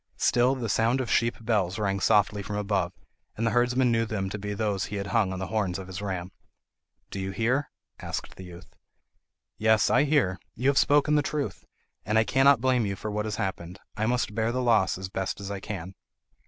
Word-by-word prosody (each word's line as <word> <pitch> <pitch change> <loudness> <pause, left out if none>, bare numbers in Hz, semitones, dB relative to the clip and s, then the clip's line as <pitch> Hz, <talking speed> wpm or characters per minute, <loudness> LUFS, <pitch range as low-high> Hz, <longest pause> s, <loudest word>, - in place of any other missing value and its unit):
Still 125 +2 +3
the 125 -3 -3
sound 115 +4 +2
of 125 -3 -2
sheep 115 0 +2
bells 100 -5 +1
rang 100 -2 0
softly 105 +1 +3
from 105 +1 -5
above, 100 -4 0 0.5
and 115 - -1
the 115 - +2
herdsman 125 +2 +2
knew 115 0 +2
them 95 -4 -3
to 105 - -4
be 105 +1 -4
those 100 -2 -1
he 105 - -6
had 100 0 -3
hung 110 -5 +2
on 95 - -4
the 95 - -3
horns 100 -5 0
of 95 - -7
his 95 +1 -7
ram. 95 -3 -4 0.8
"Do 100 - -5
you 95 0 -3
hear?" 120 +8 0 0.3
asked - - -5
the 95 - -10
youth. 90 0 -13 0.9
"Yes, 110 -1 +3
I 145 - +4
hear; 125 - +2 0.2
you 130 +4 +1
have 140 - +4
spoken 145 +1 +3
the 150 - +4
truth, 145 - -4 0.4
and 105 +2 0
I 110 - +5
cannot 135 +1 +4
blame 130 -2 +2
you 100 -2 -2
for 105 +3 -5
what 105 +1 -2
has 105 -1 -3
happened. 95 -1 -4 0.2
I 110 +1 -1
must 120 -3 0
bear 110 +1 0
the 130 +1 -1
loss 110 -7 +3
as 95 0 -5
best 95 0 -3
as 100 0 -6
I 100 - -4
can." 95 -2 -6
105 Hz, 220 wpm, -27 LUFS, 95-120 Hz, 0.9 s, I